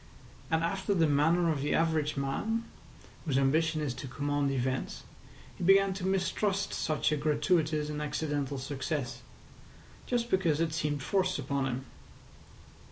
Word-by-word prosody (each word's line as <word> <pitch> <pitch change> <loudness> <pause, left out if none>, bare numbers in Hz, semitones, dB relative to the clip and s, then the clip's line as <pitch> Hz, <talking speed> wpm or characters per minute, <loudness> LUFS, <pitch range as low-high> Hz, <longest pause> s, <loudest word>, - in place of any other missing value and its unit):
And 160 0 +1
after 195 +3 0
the 165 -3 +4
manner 160 +4 +3
of 145 -3 -2
the 145 - +1
average 160 -3 +1
man, 215 +12 -1 0.6
whose 145 -5 0
ambition 155 +4 +2
is 145 -4 -1
to 135 - -7
command 145 +1 -1
events, 130 -1 -2 0.6
he - - -3
began 195 +1 +5
to 185 -1 -3
mistrust 195 +1 0
such 150 -3 0
a - - +3
gratuitous 150 +1 +1
and 150 0 -4
accidental 145 -2 -2
success—just 140 - -5
because 170 -5 +2
it 165 -1 0
seemed 150 -3 -1
forced 185 +1 +1
upon 140 -1 -1
him. 130 +1 -3
150 Hz, 140 wpm, -30 LUFS, 140-175 Hz, 0.6 s, began